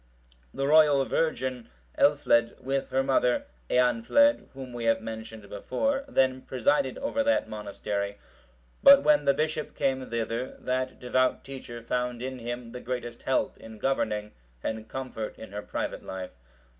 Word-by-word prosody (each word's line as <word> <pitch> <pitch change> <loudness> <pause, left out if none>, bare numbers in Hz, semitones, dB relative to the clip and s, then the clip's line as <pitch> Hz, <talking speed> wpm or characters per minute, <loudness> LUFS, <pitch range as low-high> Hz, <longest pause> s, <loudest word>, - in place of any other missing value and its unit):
The 135 - -2
royal 145 -2 +5
virgin, 130 -6 -1 0.3
Elfled,(732) 140 -5 +3
with 135 +1 -1
her 135 0 +1
mother, 130 -2 +2 0.2
Eanfled, 125 - +3
whom 130 -2 -8
we 120 -1 -4
have 115 0 +3
mentioned 110 -1 -8
before, 275 - -1
then 130 - +2
presided 130 +2 +1
over 280 0 0
that 285 +2 +2
monastery; 100 -1 -4 0.6
but 280 0 +9
when 300 -1 +4
the 140 - +5
bishop 155 +1 -2
came 130 -1 0
thither, 115 +2 -3
that 130 0 -2
devout 130 +1 +1
teacher 125 -3 -8
found 125 0 -2
in 130 0 -4
him 120 0 -5
the 125 +1 -7
greatest 120 -1 -5
help 130 - 0
in 110 -1 -11
governing, 105 -4 -1 0.3
and 110 0 -4
comfort 125 -5 -5
in 110 - -10
her 105 +1 -4
private - - -4
life. 95 -1 -6
125 Hz, 145 wpm, -28 LUFS, 115-135 Hz, 0.6 s, but